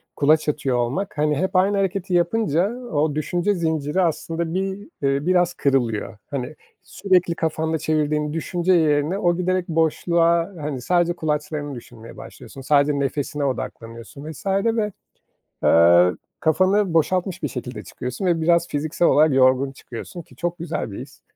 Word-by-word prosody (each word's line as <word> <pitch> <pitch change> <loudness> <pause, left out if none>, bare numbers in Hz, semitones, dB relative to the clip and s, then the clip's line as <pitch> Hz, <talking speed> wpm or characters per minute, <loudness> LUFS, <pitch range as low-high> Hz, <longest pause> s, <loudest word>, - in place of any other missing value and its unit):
kulaç 155 +1 +3
atıyor 140 -4 -1
olmak, 135 +11 -2
hani, 150 0 +1
hep 185 +4 -2
aynı 195 +2 +3
hareketi 195 -1 -1
yapınca 175 0 +1
o 155 - -1
düşünce 175 +6 0
zinciri 160 -1 -1
aslında 165 -1 -2
bir, 190 +1 -1 0.3
eee, 140 +1 0
biraz 180 -1 +2
kırılıyor. 120 -9 -1
Hani, 140 +1 -4 0.3
sürekli 180 -1 +1
kafanda 160 0 -1
çevirdiğin 150 -1 0
düşünce 175 +3 0
yerine 155 +1 +2
o 175 -3 +1
giderek 180 0 -1
boşluğa, 170 +2 +1
hani, 145 -3 -4
sadece 175 +5 +1
kulaçlarını 150 -3 -3
düşünmeye 115 -1 -12
başlıyorsun, 135 - -11
sadece 145 +1 +2
nefesine 145 +1 -2
odaklanıyorsun 125 +2 -6
vs. 155 - -12
ve, 210 +2 +1 0.7
eee, 85 +2 +6 0.3
kafanı 185 +3 +2
boşaltmış 180 +3 0
bir 150 - -1
şekilde 125 +1 -6
çıkıyorsun 125 +9 -5
ve 170 -2 +2
biraz 170 +1 +2
fiziksel 155 +3 0
olarak 155 0 +4
yorgun 130 +1 +3
çıkıyorsun 135 +6 -9
ki 125 - -21
çok 175 +5 -3
güzel 165 -8 -4
bir - - -7
his. 135 +2 -12
160 Hz, 145 wpm, -22 LUFS, 140-175 Hz, 0.7 s, eee